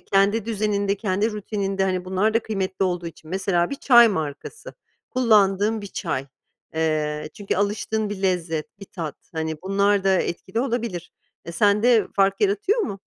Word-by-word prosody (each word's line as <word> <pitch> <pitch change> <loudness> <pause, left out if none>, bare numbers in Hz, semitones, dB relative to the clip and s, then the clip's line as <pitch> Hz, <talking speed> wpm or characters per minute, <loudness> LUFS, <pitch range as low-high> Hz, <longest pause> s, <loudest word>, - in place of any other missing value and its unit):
kendi 200 +2 +2
düzeninde, 205 -2 0
kendi 205 +1 0
rutininde, 195 -2 -2
hani, 185 -1 -1
bunlar 190 +4 0
da - - +5
kıymetli 190 -3 -2
olduğu 175 -2 -2
için; 160 -1 -11
mesela 185 -2 0
bir 280 - -3
çay 240 -4 +7
markası, 160 - -5 0.4
kullandığın 215 -3 +3
bir 200 - -6
çay. 135 -7 -3 0.5
Eee, 150 -1 -1
çünkü 205 -1 -3
alıştığın 210 +1 -1
bir 200 -1 -5
lezzet, 170 -2 -2
bir 200 - -7
tat, 165 -6 -6 0.2
hani, 160 -1 -4
bunlar 200 +1 +2
da 195 - +4
etkili 190 +6 -3
olabilir. 230 -9 -3 0.3
E, 170 - -7
sende 210 +3 +3
fark 195 0 +2
yaratıyor 210 - +2
mu? 200 - -3
195 Hz, 155 wpm, -23 LUFS, 180-215 Hz, 0.5 s, çay